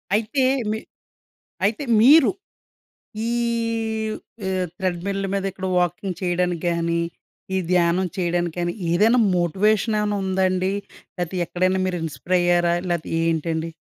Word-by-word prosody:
అయితే 230 Hz, +6 st, 0 dB, 0.3 s
మీ 215 Hz, -, -1 dB, 0.9 s
అయితే 215 Hz, +8 st, 0 dB, 0.2 s
మీరు 280 Hz, +4 st, +7 dB, 1.0 s
ఈవ్ 230 Hz, -2 st, -1 dB, 0.3 s
ఆహ్, 185 Hz, -1 st, 0 dB
త్రెడ్‌మిల్ 190 Hz, +1 st, -2 dB
మీద 195 Hz, -1 st, -1 dB
ఇక్కడ 190 Hz, 0 st, -5 dB
వాకింగ్ 180 Hz, +1 st, -1 dB
చేయడానికి 175 Hz, -1 st, 0 dB
గాని, 170 Hz, 0 st, 0 dB, 0.5 s
ఈ -, -, +2 dB
ధ్యానం 180 Hz, +1 st, +3 dB
చేయడానికి 175 Hz, -2 st, -1 dB
గాని 175 Hz, 0 st, -1 dB, 0.2 s
ఏదైనా 220 Hz, +8 st, +4 dB, 0.2 s
మోటివేషన్ 205 Hz, +6 st, +2 dB
ఏవన్నా 210 Hz, -1 st, 0 dB
ఉందాండి. 185 Hz, 0 st, +1 dB, 0.5 s
లేతే 175 Hz, +1 st, -3 dB
ఎక్కడైనా 185 Hz, +2 st, +1 dB
మీరు 180 Hz, -1 st, -2 dB
ఇన్‌స్పై‌ర్ 160 Hz, +4 st, -1 dB
అయ్యారా? 175 Hz, -1 st, +3 dB, 0.2 s
లేతే 170 Hz, -3 st, -2 dB
ఏంటండి? 165 Hz, 0 st, -1 dB
185 Hz, 115 wpm, -22 LUFS, 175-210 Hz, 1.0 s, మీరు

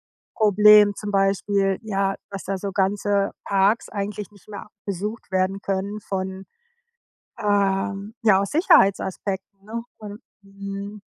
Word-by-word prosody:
Drogenproblem 210 Hz, -1 st, +5 dB
zum 210 Hz, +1 st, -5 dB
Beispiel, 195 Hz, 0 st, +1 dB
ja, 195 Hz, -3 st, -1 dB
dass 195 Hz, -1 st, -7 dB
da 195 Hz, 0 st, -2 dB
so 195 Hz, +1 st, -4 dB
ganze 200 Hz, +1 st, 0 dB
Parks, 200 Hz, +3 st, +1 dB
eigentlich 205 Hz, 0 st, -5 dB
nicht 200 Hz, -2 st, -21 dB
mehr 205 Hz, -1 st, -9 dB, 0.2 s
besucht 205 Hz, +3 st, -5 dB
werden 190 Hz, +1 st, 0 dB
können 200 Hz, +2 st, -3 dB
von 190 Hz, -1 st, -4 dB, 1.0 s
ähm, 200 Hz, 0 st, 0 dB
ja, 200 Hz, -4 st, +5 dB
aus 200 Hz, -, -2 dB
Sicherheitsaspekten, 195 Hz, -, +1 dB
ne? 230 Hz, +2 st, -6 dB
Und 210 Hz, 0 st, -9 dB, 0.2 s
mhm. 200 Hz, +1 st, -8 dB
200 Hz, 125 wpm, -23 LUFS, 195-210 Hz, 1.0 s, Drogenproblem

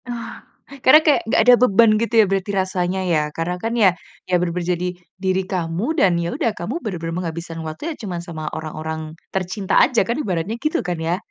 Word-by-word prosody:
Oh, 230 Hz, -1 st, -5 dB, 0.5 s
karena 295 Hz, +4 st, +8 dB
kayak 305 Hz, -2 st, +3 dB
nggak 225 Hz, -, +2 dB
ada 245 Hz, +3 st, +7 dB
beban 230 Hz, -2 st, +5 dB
gitu 230 Hz, +2 st, -1 dB
ya -, -, +7 dB
berarti 195 Hz, +1 st, -1 dB
rasanya 185 Hz, 0 st, -1 dB
ya? 160 Hz, -, +3 dB, 0.2 s
Karena 170 Hz, +2 st, -2 dB
kan 225 Hz, -, -1 dB
ya 195 Hz, -, +8 dB, 0.4 s
ya -, -, -6 dB
benar-benar 175 Hz, 0 st, -2 dB
jadi 180 Hz, +1 st, -3 dB, 0.3 s
diri 190 Hz, 0 st, 0 dB
kamu 175 Hz, 0 st, -2 dB
dan 195 Hz, -, +4 dB
ya 170 Hz, -, -2 dB
udah, 230 Hz, -, +1 dB
kamu 205 Hz, +9 st, -4 dB
benar-benar 165 Hz, -5 st, -4 dB
menghabiskan 170 Hz, -1 st, -5 dB
waktu 155 Hz, 0 st, -7 dB
ya 330 Hz, -, -3 dB
cuman 180 Hz, -5 st, -4 dB
sama 170 Hz, -2 st, -7 dB
orang-orang 160 Hz, 0 st, -5 dB, 0.3 s
tercinta 190 Hz, +1 st, 0 dB
aja 245 Hz, -, +4 dB
kan, 235 Hz, +5 st, -2 dB
ibaratnya 185 Hz, -, -2 dB
gitu 305 Hz, +3 st, 0 dB
kan 175 Hz, -1 st, -2 dB
ya? 165 Hz, +2 st, 0 dB
185 Hz, 195 wpm, -21 LUFS, 170-225 Hz, 0.5 s, karena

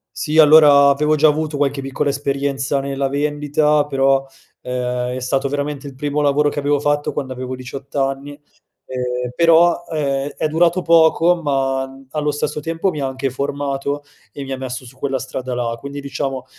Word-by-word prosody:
Sì, 155 Hz, 0 st, -2 dB
allora, 150 Hz, -2 st, +7 dB
avevo 150 Hz, +2 st, +2 dB
già 155 Hz, +1 st, +5 dB
avuto 155 Hz, 0 st, -1 dB
qualche 140 Hz, -1 st, 0 dB
piccola 135 Hz, +2 st, -2 dB
esperienza 140 Hz, 0 st, -1 dB
nella 135 Hz, 0 st, -2 dB
vendita, 145 Hz, +1 st, +1 dB
però, 135 Hz, -1 st, +2 dB, 0.4 s
ehm, 125 Hz, 0 st, -3 dB
è -, -, -4 dB
stato 135 Hz, +2 st, 0 dB
veramente 145 Hz, +1 st, -3 dB
il 135 Hz, -, -10 dB
primo 145 Hz, +2 st, -2 dB
lavoro 145 Hz, +1 st, +2 dB
che 145 Hz, -, -4 dB
avevo 145 Hz, 0 st, +1 dB
fatto 145 Hz, 0 st, 0 dB
quando 135 Hz, -3 st, -4 dB
avevo 130 Hz, 0 st, -5 dB
18 130 Hz, +2 st, -9 dB
anni, 135 Hz, +1 st, -1 dB, 0.5 s
ehm, 125 Hz, -1 st, -3 dB
però, 170 Hz, +2 st, +4 dB
ehm, 140 Hz, -3 st, -1 dB
è -, -, -1 dB
durato 170 Hz, +3 st, +2 dB
poco 170 Hz, +1 st, +4 dB
ma, 135 Hz, -2 st, 0 dB
mhmm, 135 Hz, 0 st, -15 dB
allo 150 Hz, 0 st, -1 dB
stesso 145 Hz, +1 st, -3 dB
tempo, 165 Hz, +5 st, -1 dB
mi 155 Hz, -5 st, -4 dB
ha 135 Hz, -, 0 dB
anche 130 Hz, +1 st, -3 dB
formato 140 Hz, +1 st, -3 dB, 0.3 s
e 140 Hz, -, -6 dB
mi 135 Hz, -1 st, -5 dB
messo 130 Hz, 0 st, -6 dB
su 130 Hz, +1 st, -14 dB
quella 135 Hz, 0 st, -2 dB
strada 130 Hz, 0 st, -5 dB
là, 120 Hz, -1 st, -2 dB
quindi, 140 Hz, +2 st, -7 dB
diciamo, 135 Hz, -1 st, -4 dB
140 Hz, 175 wpm, -19 LUFS, 135-150 Hz, 0.5 s, allora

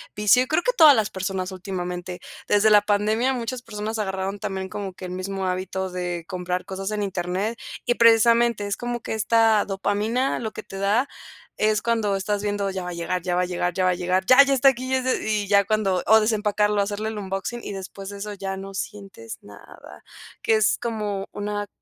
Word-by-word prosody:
vicio, 210 Hz, +4 st, +4 dB
y -, -, -8 dB
creo 310 Hz, +5 st, +1 dB
que -, -, +2 dB
todas 310 Hz, -, +8 dB
las 215 Hz, -1 st, 0 dB
personas 190 Hz, 0 st, -3 dB
últimamente. 180 Hz, -1 st, -5 dB, 0.3 s
Desde 205 Hz, +1 st, +4 dB
la 210 Hz, -1 st, +7 dB
pandemia, 215 Hz, +5 st, +1 dB
muchas 245 Hz, 0 st, -4 dB
personas 220 Hz, -1 st, -5 dB
agarraron 190 Hz, 0 st, -3 dB
también 190 Hz, 0 st, -4 dB
como 195 Hz, -2 st, -5 dB
que 185 Hz, 0 st, -9 dB
el 180 Hz, -, -6 dB
mismo 190 Hz, +1 st, -4 dB
hábito 185 Hz, 0 st, -3 dB
de 175 Hz, -2 st, -4 dB
comprar 180 Hz, 0 st, -3 dB
cosas 195 Hz, +1 st, -5 dB
en 210 Hz, -1 st, -1 dB
internet 190 Hz, +4 st, -2 dB, 0.3 s
y 240 Hz, -, +2 dB
precisamente 230 Hz, -1 st, +4 dB
es 200 Hz, -, -1 dB
como 240 Hz, 0 st, -4 dB
que -, -, -4 dB
esta 220 Hz, 0 st, +3 dB
dopamina 210 Hz, +6 st, -1 dB
lo 220 Hz, -2 st, -4 dB
que -, -, -8 dB
te 195 Hz, -, -9 dB
da, 215 Hz, +7 st, +2 dB, 0.5 s
es 215 Hz, 0 st, +1 dB
cuando 225 Hz, -4 st, +1 dB
estás 200 Hz, +1 st, -1 dB
viendo, 205 Hz, -1 st, -1 dB
ya 190 Hz, -1 st, -4 dB
va 180 Hz, -, -5 dB
a -, -, -5 dB
llegar, 170 Hz, +1 st, -2 dB
ya 175 Hz, 0 st, -1 dB
va 180 Hz, -, +2 dB
a -, -, 0 dB
llegar, 175 Hz, 0 st, -2 dB
ya 185 Hz, -, 0 dB
va 185 Hz, -, +4 dB
a -, -, +1 dB
llegar. 180 Hz, +1 st, 0 dB
Ya, 255 Hz, +6 st, +8 dB
ya 275 Hz, -, +1 dB
está 270 Hz, +1 st, +6 dB
aquí 255 Hz, -1 st, -3 dB
y -, -, +3 dB
es 260 Hz, -, 0 dB
de 255 Hz, -4 st, -1 dB
y 205 Hz, -1 st, 0 dB
ya 200 Hz, 0 st, +5 dB
cuando 200 Hz, -4 st, 0 dB
o 220 Hz, 0 st, +7 dB
desempacarlo 210 Hz, -1 st, +1 dB
hacerle 210 Hz, +2 st, -2 dB
el 215 Hz, -, -5 dB
unboxing 195 Hz, +4 st, -4 dB
y -, -, -5 dB
después 195 Hz, +1 st, -8 dB
de 200 Hz, -, -8 dB
eso 210 Hz, +1 st, -5 dB
ya 195 Hz, -1 st, -5 dB
no 195 Hz, 0 st, -8 dB
sientes 195 Hz, -, -7 dB
nada, 100 Hz, -7 st, -14 dB, 0.4 s
que 225 Hz, -, +3 dB
es 215 Hz, 0 st, +3 dB
como 210 Hz, -4 st, -3 dB
una 205 Hz, 0 st, -3 dB
205 Hz, 215 wpm, -24 LUFS, 190-220 Hz, 0.5 s, todas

